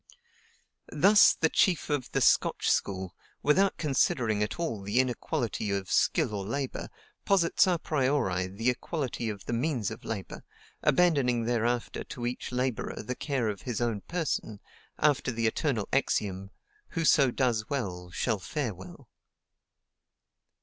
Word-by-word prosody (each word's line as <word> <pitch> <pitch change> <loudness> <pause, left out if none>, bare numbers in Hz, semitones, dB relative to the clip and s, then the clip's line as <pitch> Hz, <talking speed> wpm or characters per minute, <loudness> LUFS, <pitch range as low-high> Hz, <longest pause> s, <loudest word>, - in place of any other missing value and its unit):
Thus 195 +8 +6
the 160 - +2
chief 175 -3 +2
of 145 -4 -2
the - - 0
Scotch - - +3
school, 95 -3 -1 0.3
without 190 +7 +3
considering 130 -7 +1
at 105 - -2
all 155 -12 -2
the 100 +5 0
inequality 125 -3 -1
of 100 -2 -2
skill - - +2
or 100 -2 -3
labor, 130 +6 -4 0.3
posits 190 -2 +3
a 180 -2 +2
priori 130 - 0
the 110 +6 0
equality 125 -3 -3
of 100 -2 -7
the - - -3
means 120 - -1
of - - -9
labor, 100 -5 -6 0.4
abandoning 140 -9 +3
thereafter 120 +1 -1
to 120 - -7
each 125 +1 -4
laborer 125 -3 -2
the 125 - -3
care 130 -3 -2
of 100 -3 -3
his 120 -4 -3
own 115 -4 -1
person, 155 - -2 0.4
after 145 -4 +2
the 115 -1 -2
eternal 110 -1 0
axiom: 100 -7 0 0.5
WHOSO 155 -5 +4
DOES 120 -4 0
WELL, 90 -10 -3
SHALL 110 +4 -1
FARE 120 +4 -3
WELL. 95 +1 -12
120 Hz, 140 wpm, -29 LUFS, 105-145 Hz, 0.5 s, Thus